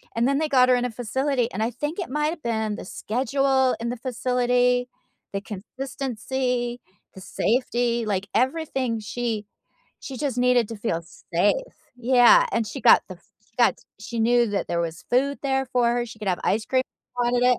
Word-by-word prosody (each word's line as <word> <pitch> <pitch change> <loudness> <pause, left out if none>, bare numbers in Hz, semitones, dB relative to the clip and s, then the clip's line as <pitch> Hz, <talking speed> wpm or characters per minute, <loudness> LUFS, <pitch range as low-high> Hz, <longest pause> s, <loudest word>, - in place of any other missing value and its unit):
and 230 +2 +2
then 275 0 +2
they 315 - 0
got 255 -3 +4
her 250 - +6
in 245 0 0
a 245 - -2
facility, 250 +2 -1
and 195 - -4
I 230 - -1
think 295 - -4
it 370 - -4
might’ve 300 +4 -1
been 220 -2 -1
the - - -8
schedule 265 +4 +1
in 235 - -2
the 245 - -4
facility, 250 0 +1 0.5
the 195 - -2
consistency, 245 +3 -3 0.4
the 190 - -9
safety, 240 +1 0
like, 200 -2 -1
everything, 260 -2 0
she 220 0 -3 0.6
she 265 - -7
just 270 -2 -2
needed 250 -2 +3
to 230 - -6
feel 205 -6 -2 0.3
safe. 205 - +1 0.2
Yeah, 250 - +6
and 230 - 0
she 210 - -6
got - - +7
the 185 - -7
f 175 - -30 0.2
she - - -35
got 240 - +4 0.3
she 230 +2 -6
knew 240 +1 +3
that 205 -1 -2
there 170 - 0
was 165 -1 -4
food 275 +3 +2
there 270 -1 +1
for 245 -1 +3
her, 240 0 -1
she 220 - -11
could 210 - -7
have 180 - 0
ice 215 +2 +1
cream 260 -1 +2 0.4
wanted 245 0 +2
it, 250 -1 +4
245 Hz, 190 wpm, -24 LUFS, 225-260 Hz, 0.6 s, got